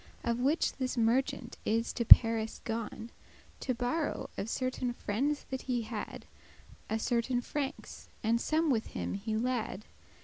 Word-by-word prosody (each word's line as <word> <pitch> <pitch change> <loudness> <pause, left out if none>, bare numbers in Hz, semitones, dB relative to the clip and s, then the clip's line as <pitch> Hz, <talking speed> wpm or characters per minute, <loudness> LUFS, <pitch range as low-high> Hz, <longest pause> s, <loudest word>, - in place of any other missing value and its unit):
*crowns, 235 - +1
ecus - - -4
For - - -2
which 305 +4 +2
this 260 -2 -2
merchant 255 +5 0
is 230 +2 0
to 240 - -1
Paris 225 -1 +7
gone, 225 0 -5 0.5
To 255 - -2
borrow 250 +6 -2
of 210 - -4
certain 255 -1 -2
friendes 275 +9 -1
that 265 - -3
he 245 -3 -1
had 220 -1 -6 0.6
A 220 - 0
certain 240 +2 0
francs, 280 +3 -5
and 230 +2 +2
some 315 0 +1
with 225 -3 0
him - - -2
he 215 +2 -2
lad. 225 -4 -2
240 Hz, 160 wpm, -31 LUFS, 225-260 Hz, 0.6 s, Paris